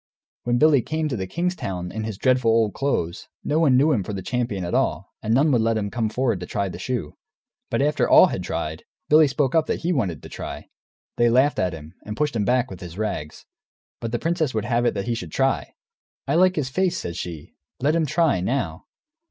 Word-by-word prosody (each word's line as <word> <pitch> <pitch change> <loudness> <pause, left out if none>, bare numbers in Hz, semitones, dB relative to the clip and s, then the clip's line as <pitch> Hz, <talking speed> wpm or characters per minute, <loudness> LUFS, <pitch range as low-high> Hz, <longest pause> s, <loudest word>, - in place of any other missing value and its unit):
When 120 0 +2
Billy 150 -1 +5
came 155 +4 -2
to 130 - -2
the 95 -3 -4
king's 180 - -1
town, 95 - -4
in 110 0 -4
his 110 -3 -5
dreadful 130 -1 +2
old 110 -2 +3
clothes, 110 -12 -2 0.2
no 150 +2 +1
one 140 -6 +4
knew 145 +4 +4
him 120 -8 +2
for 105 - -5
the 95 -2 -5
champion 115 -7 -2
at 85 - -4
all, - - 0
and 110 - -2
none 140 +6 +4
would 120 -4 +3
let 115 0 +1
him 100 -2 -2
come 115 -3 -1
forward 115 -3 0
to 90 - -7
try 100 -2 -2
the - - -8
shoe. 120 - -3 0.6
But - - +1
after 150 +1 +1
all - - +9
had - - -2
tried, 80 +1 -4 0.3
Billy 155 0 +7
spoke 135 -1 0
up 160 -1 +3
that - - -2
he 175 +2 0
wanted 95 - -2
to - - -9
try. - - -7 0.5
They 120 0 +4
laughed 130 +5 +3
at 90 -1 0
him, 80 0 -10
and 105 +1 -6
pushed 150 -3 0
him 105 -3 0
back, 125 0 +1
with - - -8
his 90 -2 -9
rags. 75 -8 -4 0.5
But 115 - -4
the 120 - 0
princess 160 -3 -1
would 110 -1 -1
have 120 0 +1
it - - 0
that 100 - -2
he 120 - 0
should 90 -8 -5
try. - - 0 0.5
"I - - +1
like 185 +2 +4
his 140 -5 -1
face," 185 +5 0
said 85 - -5
she; 85 -4 -7 0.3
"let 145 +4 +2
him 165 -2 +1
try, 155 - +2
now." 95 -6 -2
120 Hz, 235 wpm, -23 LUFS, 100-145 Hz, 0.6 s, all